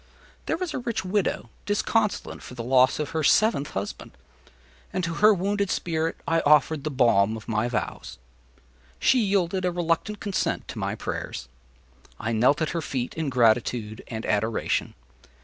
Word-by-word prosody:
There -, -, 0 dB
was 360 Hz, -4 st, -3 dB
a -, -, -2 dB
rich 235 Hz, -5 st, -3 dB
widow 185 Hz, -, -1 dB, 0.2 s
disconsolate 210 Hz, 0 st, 0 dB
for 125 Hz, -, -10 dB
the 120 Hz, -, -5 dB
loss 130 Hz, +1 st, +4 dB
of 150 Hz, -2 st, -3 dB
her 160 Hz, -1 st, -1 dB
seventh 180 Hz, -2 st, +3 dB
husband, 100 Hz, +1 st, -5 dB, 0.8 s
and 185 Hz, -, -2 dB
to 165 Hz, 0 st, -1 dB
her 215 Hz, +1 st, +8 dB
wounded 200 Hz, +1 st, 0 dB
spirit 165 Hz, -2 st, -1 dB
I 165 Hz, 0 st, +3 dB
offered 150 Hz, -1 st, +3 dB
the 155 Hz, -, -1 dB
balm 110 Hz, -6 st, +3 dB
of 110 Hz, -, -12 dB
my 110 Hz, +1 st, 0 dB
vows. 120 Hz, -3 st, -4 dB, 0.8 s
She 260 Hz, -, +3 dB
yielded 195 Hz, -3 st, +1 dB
a 180 Hz, -, +1 dB
reluctant 175 Hz, +4 st, -1 dB
consent 200 Hz, -3 st, -2 dB
to -, -, -6 dB
my -, -, -2 dB
prayers. -, -, -5 dB, 0.7 s
I 110 Hz, -, -2 dB
knelt 125 Hz, +8 st, +3 dB
at 155 Hz, -, -1 dB
her 170 Hz, -, -2 dB
feet 130 Hz, -5 st, -3 dB
in 160 Hz, -3 st, -2 dB
gratitude 115 Hz, -2 st, +1 dB
and 110 Hz, -1 st, -5 dB
adoration. 110 Hz, +2 st, 0 dB
155 Hz, 165 wpm, -25 LUFS, 120-190 Hz, 0.8 s, her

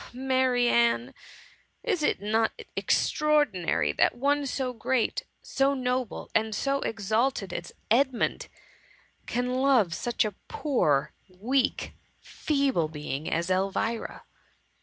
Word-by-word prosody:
Oh, 245 Hz, -, -14 dB
Marianne! 245 Hz, -, +2 dB, 0.7 s
is 395 Hz, -9 st, 0 dB
it 295 Hz, -, +1 dB
not 220 Hz, -, 0 dB, 0.2 s
extraor^ 300 Hz, -1 st, +2 dB
dinary 170 Hz, -, -1 dB
that -, -, +3 dB
one 285 Hz, +2 st, +1 dB
so 260 Hz, -1 st, -2 dB
great, 245 Hz, 0 st, -1 dB, 0.2 s
so 275 Hz, +1 st, +1 dB
noble, 250 Hz, -2 st, -2 dB
and 220 Hz, -1 st, +1 dB
so 275 Hz, +5 st, 0 dB
ex 210 Hz, -5 st, -4 dB
alted 220 Hz, -5 st, +1 dB
as 175 Hz, -, -5 dB, 0.2 s
Edmund, 260 Hz, +1 st, +1 dB, 0.8 s
can 250 Hz, +1 st, -1 dB
love 255 Hz, -10 st, +3 dB
such 240 Hz, +4 st, 0 dB
a 210 Hz, -, -3 dB, 0.2 s
poor^ 255 Hz, -, +1 dB, 0.2 s
weak, 245 Hz, +9 st, -1 dB, 0.3 s
feeble 275 Hz, -, 0 dB
being 150 Hz, -1 st, -5 dB
as 170 Hz, +3 st, -1 dB
Elvira? 195 Hz, +5 st, -1 dB
240 Hz, 115 wpm, -27 LUFS, 190-270 Hz, 0.8 s, that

